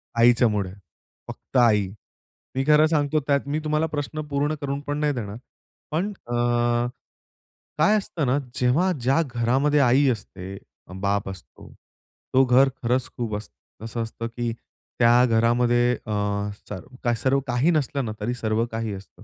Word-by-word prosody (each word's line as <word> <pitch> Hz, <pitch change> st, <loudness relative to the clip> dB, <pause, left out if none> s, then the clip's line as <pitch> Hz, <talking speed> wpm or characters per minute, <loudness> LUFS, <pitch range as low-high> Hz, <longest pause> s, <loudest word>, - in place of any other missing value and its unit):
आईच्यामुळे, 115 Hz, -5 st, +3 dB, 0.5 s
फक्त -, -, -5 dB
आई. 105 Hz, -5 st, +4 dB, 0.7 s
मी 135 Hz, -, +1 dB
खरं 150 Hz, 0 st, +6 dB
सांगतो 155 Hz, -1 st, +1 dB
त्यात 140 Hz, -1 st, +1 dB
मी 150 Hz, +2 st, -1 dB
तुम्हाला 155 Hz, +1 st, +1 dB
प्रश्न 150 Hz, 0 st, -4 dB
पूर्ण 145 Hz, +2 st, 0 dB
करून 140 Hz, 0 st, -2 dB
पण 145 Hz, -, -1 dB
नाही 150 Hz, -1 st, +1 dB
देणार. 110 Hz, -4 st, -5 dB, 0.5 s
पण 180 Hz, +7 st, -1 dB, 0.2 s
अ, 120 Hz, -, -4 dB, 1.4 s
काय 185 Hz, +8 st, +4 dB
असतं 175 Hz, -7 st, -2 dB
ना, 130 Hz, +3 st, +2 dB, 0.2 s
जेव्हा 140 Hz, +10 st, +2 dB
ज्या 135 Hz, +7 st, +3 dB
घरामध्ये 130 Hz, +5 st, +2 dB
आई 135 Hz, +1 st, +4 dB
असते, 100 Hz, -4 st, -5 dB, 0.4 s
बाप 100 Hz, 0 st, 0 dB
असतो. 95 Hz, -3 st, -11 dB, 0.6 s
तो 130 Hz, +1 st, +6 dB
घर 130 Hz, +2 st, +5 dB
खरंच 125 Hz, +2 st, 0 dB
खूप 115 Hz, -3 st, -2 dB
असतं 105 Hz, +1 st, -12 dB
असं 115 Hz, +1 st, -4 dB
असतं 115 Hz, +1 st, -5 dB
की 120 Hz, -1 st, -1 dB, 0.5 s
त्या 120 Hz, +1 st, +6 dB
घरामध्ये 120 Hz, +1 st, +3 dB
अ, 110 Hz, -, -3 dB, 1.0 s
सर्व 135 Hz, +3 st, +1 dB
काही 125 Hz, +7 st, +2 dB
चा 155 Hz, -, +3 dB
नसलं 140 Hz, -2 st, -1 dB
ना, 110 Hz, -, -3 dB
तरी 115 Hz, +4 st, -2 dB
सर्व 115 Hz, -1 st, 0 dB
काही 110 Hz, -2 st, -3 dB
असतं. 95 Hz, 0 st, -12 dB
125 Hz, 145 wpm, -24 LUFS, 115-145 Hz, 1.4 s, खरं